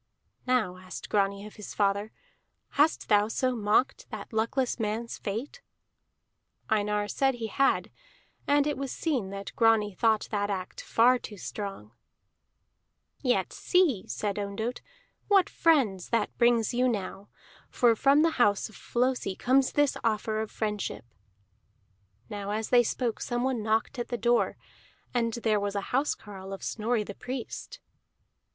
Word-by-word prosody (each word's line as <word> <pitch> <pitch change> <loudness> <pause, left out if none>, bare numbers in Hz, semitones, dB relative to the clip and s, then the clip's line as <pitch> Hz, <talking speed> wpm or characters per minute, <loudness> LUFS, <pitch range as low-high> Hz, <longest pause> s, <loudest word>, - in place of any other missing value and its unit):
"Now," 220 -8 +1
asked 185 0 -9
Grani 200 0 +1
of 215 - -12
his 210 - -8
father, 200 +1 +1 0.6
"hast 300 +3 +2
thou 210 -1 +4
so 255 +3 0
mocked 220 +4 +1
that - - -8
luckless 240 +4 0
man's 225 +2 -3
fate?" 235 - -5 1.1
Einar 210 -1 +1
said 270 +4 +1
he 235 -2 -4
had, 270 +5 +1 0.6
and 285 0 +4
it 295 -1 -1
was 275 -1 -3
seen 260 - -1
that 195 0 -7
Grani 225 -3 +3
thought 220 +2 +2
that 205 -1 0
act 185 -2 -4
far 245 +2 +4
too 210 - -9
strong. 195 - -6 1.3
"Yet 250 -3 +1
see," 340 - +2
said 200 - -2
Ondott, 205 +4 -3 0.5
"what 395 -3 +5
friends 250 - +2
that 230 -3 0
brings 235 -1 +3
you 250 +1 +3
now, 200 -2 -4 0.4
for 240 -3 +4
from 280 +6 +4
the 330 - +3
house 205 -2 +3
of 215 - -16
Flosi 245 -5 -1
comes 260 +4 +2
this 290 -2 +3
offer 215 -1 0
of 220 - -4
friendship." 210 - -3 1.2
Now 205 -1 -5
as 215 +1 -2
they 245 -1 +6
spoke 240 0 -2
someone 245 0 -1
knocked 220 +4 0
at 240 - -2
the 240 - -3
door, 235 +2 +2 0.6
and 235 -2 +1
there 220 -2 +1
was 200 0 -2
a 200 - -4
housecarle 205 -8 -2
of 195 - -8
Snorri 225 0 0
the 205 - -7
Priest. 250 +3 -6
225 Hz, 145 wpm, -28 LUFS, 205-250 Hz, 1.3 s, they